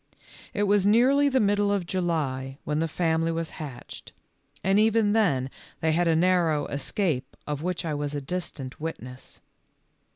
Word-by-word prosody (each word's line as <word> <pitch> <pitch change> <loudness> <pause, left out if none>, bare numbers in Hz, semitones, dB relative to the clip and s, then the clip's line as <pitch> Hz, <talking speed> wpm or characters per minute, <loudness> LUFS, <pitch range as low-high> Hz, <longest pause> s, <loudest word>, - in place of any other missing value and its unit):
It 205 - -1
was 200 -1 +3
nearly 265 +7 +4
the 265 -1 +2
middle 205 -1 +2
of 200 -3 0
July 150 -7 -2
when 150 0 -1
the 165 - +1
family 165 0 0
was 165 0 -3
hatched, 135 -5 -9 0.5
and 195 +3 +3
even 220 -1 +3
then 140 - +1 0.3
they 160 - +1
had 170 +2 +2
a 165 - +3
narrow 165 -4 +2
escape 145 0 -2
of 150 -1 -3
which 180 0 -2
I 155 - -1
was 145 0 -3
a - - -1
distant 140 -4 -5
witness. 130 -5 -7
165 Hz, 160 wpm, -26 LUFS, 145-200 Hz, 0.5 s, nearly